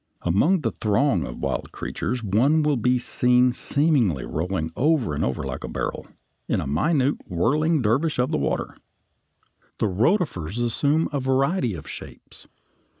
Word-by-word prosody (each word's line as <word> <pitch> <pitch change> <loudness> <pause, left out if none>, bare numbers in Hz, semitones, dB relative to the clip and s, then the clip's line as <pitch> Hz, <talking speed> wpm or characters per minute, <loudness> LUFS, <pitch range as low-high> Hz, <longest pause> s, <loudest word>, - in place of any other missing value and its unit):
Among 150 - +2
the 115 -5 -1
throng 105 - +1
of - - -8
wonderful - - -3
creatures 120 +1 -4
one 130 +10 +3
will 150 -1 +2
be 125 +1 +2
seen 125 +1 +2
seemingly 130 - +1
rolling 80 0 -2
over 145 - +1
and 75 +1 -1
over 65 +1 -2
like 65 -1 -5
a - - -4
barrel, - - -4 0.4
a - - 0
minute 135 - +1
whirling 145 - +1
Dervish 135 +9 +1
of 125 +4 +1
the 155 - +1
water. - - -2 1.0
The - - 0
rotifers 105 - 0
assume 140 +7 +1
a 140 - 0
variety 135 - +1
of 80 - -9
shapes. - - -11
125 Hz, 150 wpm, -24 LUFS, 95-150 Hz, 1.0 s, one